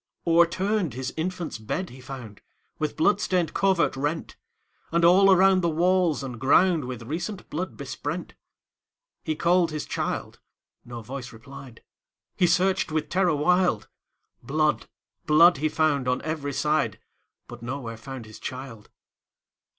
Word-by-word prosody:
O'erturned 170 Hz, -, +2 dB
his 130 Hz, 0 st, -4 dB
infant's 170 Hz, -5 st, -4 dB
bed 165 Hz, -, -4 dB
he 130 Hz, +1 st, -12 dB
found, 120 Hz, -5 st, -9 dB, 0.4 s
With 155 Hz, -1 st, -2 dB
blood 205 Hz, +6 st, +3 dB
stained 180 Hz, -5 st, 0 dB
covert 190 Hz, -6 st, +2 dB
rent; 145 Hz, +4 st, -3 dB, 0.6 s
And 170 Hz, 0 st, +3 dB
all 190 Hz, +3 st, +6 dB
around 190 Hz, 0 st, +5 dB
the 170 Hz, -, +1 dB
walls 175 Hz, -2 st, +2 dB
and 125 Hz, -4 st, -7 dB
groundWith 135 Hz, -5 st, +2 dB
recent 180 Hz, -, -5 dB
blood 180 Hz, +4 st, -4 dB
besprent. -, -, -5 dB, 0.9 s
He 155 Hz, -, -2 dB
called 170 Hz, +1 st, +2 dB
his 150 Hz, -1 st, -4 dB
child,—no 120 Hz, -1 st, -7 dB
voice 130 Hz, +1 st, -7 dB
replied,—He 135 Hz, +7 st, -6 dB
searched 180 Hz, 0 st, +2 dB
with 155 Hz, -1 st, -2 dB
terror 180 Hz, -3 st, +2 dB
wild; 175 Hz, -, +1 dB, 0.5 s
Blood, 155 Hz, +2 st, 0 dB, 0.4 s
blood, 165 Hz, +2 st, +6 dB
he 155 Hz, +3 st, 0 dB
found 150 Hz, -4 st, +1 dB
on 125 Hz, 0 st, 0 dB
every 150 Hz, -3 st, -3 dB
side, 150 Hz, -7 st, 0 dB, 0.5 s
But 120 Hz, -1 st, -10 dB
nowhere 120 Hz, -1 st, -5 dB
found 130 Hz, +1 st, -8 dB
his 110 Hz, 0 st, -12 dB
child. 125 Hz, -4 st, -8 dB
155 Hz, 130 wpm, -25 LUFS, 130-180 Hz, 0.9 s, all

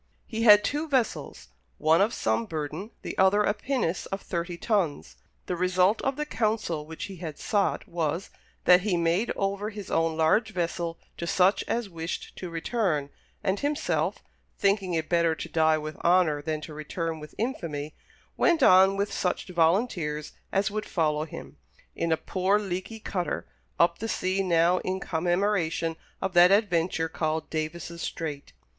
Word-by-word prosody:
He 225 Hz, -1 st, -4 dB
had 210 Hz, -2 st, +8 dB
two 295 Hz, +6 st, -1 dB
vessels 255 Hz, -, -1 dB, 0.3 s
one 160 Hz, +3 st, +4 dB
of 210 Hz, +3 st, +3 dB
some 110 Hz, -, 0 dB
burden, 155 Hz, +5 st, -4 dB
the -, -, -5 dB
other 190 Hz, +2 st, +5 dB
a 205 Hz, -, +2 dB
pinnace 240 Hz, -8 st, -2 dB
of 195 Hz, -, -4 dB
thirty 170 Hz, 0 st, -3 dB
tons. 190 Hz, -8 st, -1 dB, 0.3 s
The 180 Hz, -, -2 dB
result 185 Hz, +4 st, +2 dB
of 270 Hz, 0 st, 0 dB
the 300 Hz, +1 st, -2 dB
counsel 215 Hz, -, -1 dB
which 160 Hz, 0 st, -7 dB
he 195 Hz, -2 st, -6 dB
had 160 Hz, -4 st, -6 dB
sought 205 Hz, -2 st, 0 dB
was, 165 Hz, +1 st, -2 dB, 0.3 s
that 180 Hz, 0 st, +7 dB
he 190 Hz, -2 st, 0 dB
made 170 Hz, +7 st, +1 dB
over 200 Hz, +1 st, -1 dB
his 210 Hz, -3 st, -8 dB
own 165 Hz, -1 st, +1 dB
large 215 Hz, +8 st, +2 dB
vessel 170 Hz, -1 st, -2 dB, 0.2 s
to 170 Hz, -, -4 dB
such 190 Hz, +3 st, +3 dB
as 235 Hz, -2 st, -1 dB
wished 165 Hz, -1 st, -6 dB
to 180 Hz, -, -5 dB
return, 165 Hz, -4 st, -1 dB, 0.3 s
and 190 Hz, +1 st, 0 dB
himself, 290 Hz, +1 st, -1 dB, 0.3 s
"thinking 195 Hz, -3 st, +1 dB
it 160 Hz, -1 st, -1 dB
better 170 Hz, -2 st, +2 dB
to -, -, -6 dB
die 160 Hz, -1 st, +3 dB
with 155 Hz, 0 st, -6 dB
honour 170 Hz, -4 st, +3 dB
than 155 Hz, 0 st, -3 dB
to 155 Hz, -, -8 dB
return 160 Hz, +2 st, -4 dB
with 150 Hz, 0 st, -11 dB
infamy," 155 Hz, -, -3 dB, 0.4 s
went 335 Hz, -5 st, +3 dB
on 190 Hz, 0 st, +6 dB
with 200 Hz, +1 st, -1 dB
such 180 Hz, +1 st, -1 dB
volunteers 165 Hz, -3 st, +1 dB, 0.2 s
as 200 Hz, +2 st, +1 dB
would 215 Hz, 0 st, -3 dB
follow 155 Hz, -3 st, 0 dB
him, 160 Hz, -, -10 dB, 0.4 s
in 170 Hz, -, -1 dB
a 160 Hz, -, +3 dB
poor 190 Hz, +4 st, +1 dB
leaky 205 Hz, +2 st, -4 dB
cutter, 180 Hz, -4 st, -3 dB, 0.3 s
up 170 Hz, 0 st, +3 dB
the 225 Hz, -, -3 dB
sea 185 Hz, 0 st, 0 dB
now 175 Hz, -1 st, +3 dB
in 190 Hz, +1 st, -2 dB
commemoration 175 Hz, -1 st, 0 dB, 0.3 s
of 190 Hz, -1 st, -1 dB
that 175 Hz, 0 st, +7 dB
adventure 175 Hz, -5 st, +2 dB
called 160 Hz, -1 st, -2 dB
Davis' 170 Hz, +2 st, -4 dB
Strait. 150 Hz, -4 st, -5 dB
180 Hz, 165 wpm, -27 LUFS, 160-200 Hz, 0.4 s, had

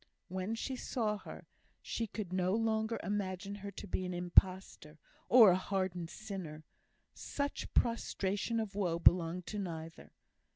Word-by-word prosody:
When 185 Hz, +4 st, -2 dB
she 260 Hz, +3 st, -3 dB
saw 220 Hz, -4 st, -1 dB
her, -, -, -10 dB, 0.3 s
she 230 Hz, -, -3 dB
could 200 Hz, -3 st, -5 dB
no 185 Hz, +1 st, +1 dB
longer 225 Hz, 0 st, 0 dB
imagine 195 Hz, 0 st, -2 dB
her 200 Hz, 0 st, -6 dB
to 195 Hz, -, -7 dB
be 185 Hz, -, -2 dB
an 180 Hz, -1 st, -3 dB
impostor, 175 Hz, -3 st, +2 dB, 0.3 s
or 230 Hz, -6 st, +9 dB
a -, -, +4 dB
hardened 185 Hz, -3 st, -2 dB
sinner; 175 Hz, -5 st, -7 dB, 0.5 s
such 285 Hz, 0 st, -4 dB
prostration 230 Hz, -1 st, 0 dB
of 220 Hz, -3 st, -3 dB
woe 180 Hz, -5 st, 0 dB
belonged 170 Hz, 0 st, +4 dB
to 210 Hz, -, -4 dB
neither. 165 Hz, -4 st, -6 dB
190 Hz, 140 wpm, -34 LUFS, 180-215 Hz, 0.5 s, or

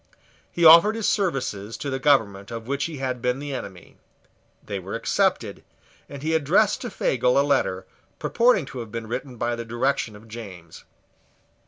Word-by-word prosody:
He 170 Hz, -, +1 dB
offered 170 Hz, +7 st, +8 dB
his 225 Hz, -2 st, -1 dB
services 120 Hz, -, -1 dB
to 140 Hz, +4 st, -4 dB
the 130 Hz, -, -2 dB
government 110 Hz, -9 st, +2 dB
of 115 Hz, -1 st, -7 dB
which 140 Hz, +3 st, -2 dB
he 160 Hz, -3 st, -6 dB
had 130 Hz, -2 st, -3 dB
been 125 Hz, 0 st, 0 dB
the 145 Hz, 0 st, -6 dB
enemy: 95 Hz, -8 st, -8 dB, 0.7 s
they -, -, -4 dB
were -, -, -6 dB
accepted; -, -, 0 dB, 0.5 s
and 140 Hz, 0 st, -9 dB
he 160 Hz, +1 st, 0 dB
addressed 160 Hz, +3 st, +2 dB
to -, -, -4 dB
Fagel -, -, +1 dB
a -, -, +3 dB
letter, -, -, 0 dB, 0.3 s
purporting 235 Hz, -, +2 dB
to 130 Hz, -, -8 dB
have 115 Hz, -3 st, -7 dB
been 115 Hz, 0 st, -5 dB
written 125 Hz, +3 st, -5 dB
by 120 Hz, +1 st, -1 dB
the 115 Hz, -, -5 dB
direction 120 Hz, -1 st, -1 dB
of 105 Hz, +2 st, -15 dB
James. 95 Hz, -8 st, -10 dB
130 Hz, 175 wpm, -24 LUFS, 115-155 Hz, 0.7 s, offered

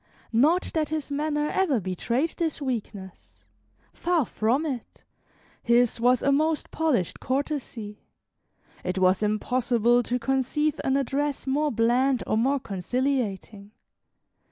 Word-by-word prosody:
Not 305 Hz, +10 st, +3 dB
that 310 Hz, -2 st, 0 dB
his 305 Hz, -2 st, -3 dB
manner 295 Hz, +1 st, -1 dB
ever 335 Hz, -11 st, +1 dB
betrayed 235 Hz, -, -1 dB
this 325 Hz, -3 st, -1 dB
weakness; 215 Hz, -, -6 dB, 0.5 s
far 340 Hz, -5 st, +1 dB
from 240 Hz, +10 st, 0 dB
it, 260 Hz, -7 st, -6 dB, 0.6 s
his 235 Hz, 0 st, +3 dB
was 250 Hz, +1 st, +3 dB
a 280 Hz, -, +3 dB
most 310 Hz, +2 st, +1 dB
polished 285 Hz, -, 0 dB
courtesy. 255 Hz, -6 st, -3 dB, 0.8 s
It 185 Hz, +1 st, -2 dB
was 185 Hz, +1 st, +3 dB
impossible 240 Hz, +2 st, +2 dB
to 245 Hz, +1 st, -1 dB
conceive 270 Hz, +4 st, 0 dB
an 270 Hz, 0 st, +2 dB
address 280 Hz, +1 st, -1 dB
more 290 Hz, +3 st, +1 dB
bland 245 Hz, +3 st, +2 dB
or -, -, 0 dB
more 270 Hz, +5 st, +2 dB
conciliating. 210 Hz, -1 st, -3 dB
255 Hz, 120 wpm, -26 LUFS, 225-295 Hz, 0.8 s, Not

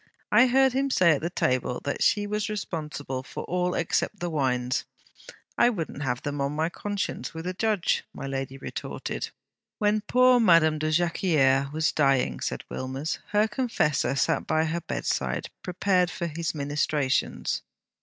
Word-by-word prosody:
I 250 Hz, -, +7 dB
heard 265 Hz, +1 st, +4 dB
him 275 Hz, +1 st, +1 dB
say 185 Hz, -9 st, +4 dB
at 165 Hz, +4 st, -1 dB
table 125 Hz, -1 st, 0 dB
that 140 Hz, -, -3 dB
she 205 Hz, -1 st, +3 dB
was 210 Hz, +1 st, -2 dB
responsible 150 Hz, -9 st, -4 dB
for -, -, -7 dB
all 180 Hz, 0 st, -1 dB
except 175 Hz, +4 st, 0 dB
the 175 Hz, -1 st, -3 dB
wines. 125 Hz, -4 st, 0 dB, 0.8 s
"I 240 Hz, -, +6 dB
wouldn't 165 Hz, -, -4 dB
have 125 Hz, -3 st, -2 dB
them 145 Hz, -1 st, -3 dB
on 140 Hz, +1 st, -1 dB
my 160 Hz, +2 st, 0 dB
conscience, 205 Hz, -2 st, -4 dB
with 160 Hz, +1 st, -6 dB
a 185 Hz, -, -2 dB
Judge!" 210 Hz, -2 st, +1 dB
my -, -, -7 dB
lady 135 Hz, -1 st, -4 dB
retorted.' 135 Hz, -, -5 dB, 0.5 s
'When 210 Hz, 0 st, +2 dB
poor 250 Hz, +3 st, +4 dB
Madame 165 Hz, -7 st, +5 dB
de 155 Hz, 0 st, 0 dB
Jacquieres 155 Hz, -5 st, +2 dB
was 155 Hz, +1 st, +1 dB
dying,' 135 Hz, -3 st, +2 dB
said -, -, -3 dB
Wilmers, 135 Hz, +3 st, -4 dB
'her 210 Hz, +1 st, +2 dB
confessor 210 Hz, -, 0 dB
sat 135 Hz, -, +1 dB
by 155 Hz, 0 st, +2 dB
her 165 Hz, +2 st, -2 dB
bedside, 65 Hz, -, -2 dB
prepared 180 Hz, 0 st, +1 dB
for 170 Hz, -, -4 dB
his 165 Hz, 0 st, -3 dB
ministrations. 145 Hz, -2 st, 0 dB
160 Hz, 155 wpm, -26 LUFS, 140-205 Hz, 0.8 s, I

